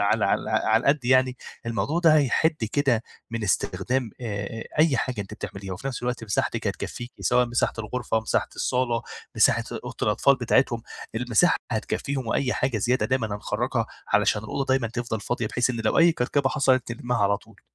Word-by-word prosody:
على 100 - +2
على - - 0
على 110 +1 +3
القد 140 0 +2
يعني، 130 0 +3 0.3
الموضوع 115 +8 -1
ده 165 -3 +5
هيحِد 150 0 +2
كده 135 -6 +2 0.3
من 115 -1 -3
استخدام 105 +5 0
آآ 110 0 -4
أي 155 -3 +5
حاجة 130 -7 -2
أنتِ 100 - -7
بتعمليها، 95 -1 -6
وفي 105 +9 -6
نَفْس 125 -3 -4
الوقت 125 -2 -2
مساحتِك 100 - -1
هتكفّيكِ، 120 +1 -4
سواء 125 0 +3
مساحة 120 0 +1
الغرفة، 110 0 -1
مساحة 110 - 0
الصالة، 125 -2 0 0.3
مساحة - - +4 0.2
أوضة - - -7
الأطفال 140 - +4
بتاعتهم. 120 -1 +2 0.3
المساحة 120 - +3 0.2
هتكفّيهم 130 +4 -2
وأي 130 +3 0
حاجة 130 -4 0
زيادة 125 +5 +1
دايمًا 130 -3 0
هنخرّجها 110 +3 -2 0.2
علشان 105 0 +2
الأوضة 135 +5 -2
دايمًا 130 -3 +2
تفضل 115 -2 -3
فاضية، 120 -1 -2
بحيث 125 +3 +1
إن 115 - -3
لو 110 - +2
أي 165 0 +6
كركبة 135 0 +1
حصلت 130 -4 +2
تلمّها 120 +1 -2
على 100 -1 +3
طول. - - -19
120 Hz, 170 wpm, -25 LUFS, 110-130 Hz, 0.3 s, أي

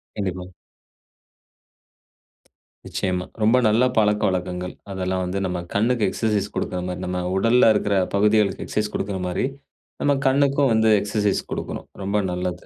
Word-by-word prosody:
கண்டிப்பா. 95 -3 -3 2.4
நிச்சயமா. 90 -1 -2 0.2
ரொம்ப 110 +4 +4
நல்ல 110 +3 +3
பழக்கவழக்கங்கள், 90 -4 0 0.2
அதெல்லாம் 95 -1 -2
வந்து 90 +2 -2
நம்ம 90 -1 -2
கண்ணுக்கு 115 +2 +1
எக்சர்சைஸ் 105 -1 -1
கொடுக்கிற 90 - -2
மாரி, 90 0 -4
நம்ம 90 0 -2
உடல்ல 115 +4 +4
இருக்கிற 105 -1 +1 0.2
பகுதிகளுக்கு 105 0 +2
எக்சர்சைஸ் 105 0 -2
கொடுக்கிற 95 -1 -2
மாரி 90 - -1 0.6
நம்ம 145 - +3
கண்ணுக்கும் 140 0 +3
வந்து 110 0 +3
எக்சர்சைஸ் 105 -1 0
கொடுக்கணும், - - -5 0.2
ரொம்ப 100 +2 0
நல்லது. 90 0 -4
100 Hz, 125 wpm, -23 LUFS, 90-110 Hz, 2.4 s, ரொம்ப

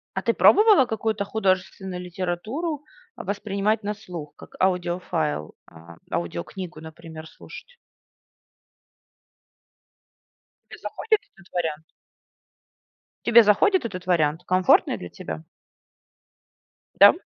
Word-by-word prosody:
А - - -1
ты - - +1
пробовала 420 - +6
какую-то 220 -2 -2
художественную 190 -2 -1
литературу, 200 - -4 0.3
а, - - -8
воспринимать 205 +2 -1
на 205 +1 -2
слух 180 -8 -9
как - - -14
аудиофайл, 175 - -1 0.2
а, 85 +1 -14
аудиокнигу, 155 - -5
например, 160 0 -10
слушать? 485 - -13 2.9
Те - - -10
заходит 440 -2 0
этот 195 -2 -20
вариант? 160 -3 -2 1.4
Тебе 235 0 +7
заходит 270 - +3
этот 185 -5 -6
вариант? 160 -2 +1
Комфортный 185 0 +3
для 90 - -8
тебя? 80 -2 -7 1.6
Да, - - +11
м? - - +4
185 Hz, 100 wpm, -24 LUFS, 160-220 Hz, 2.9 s, Да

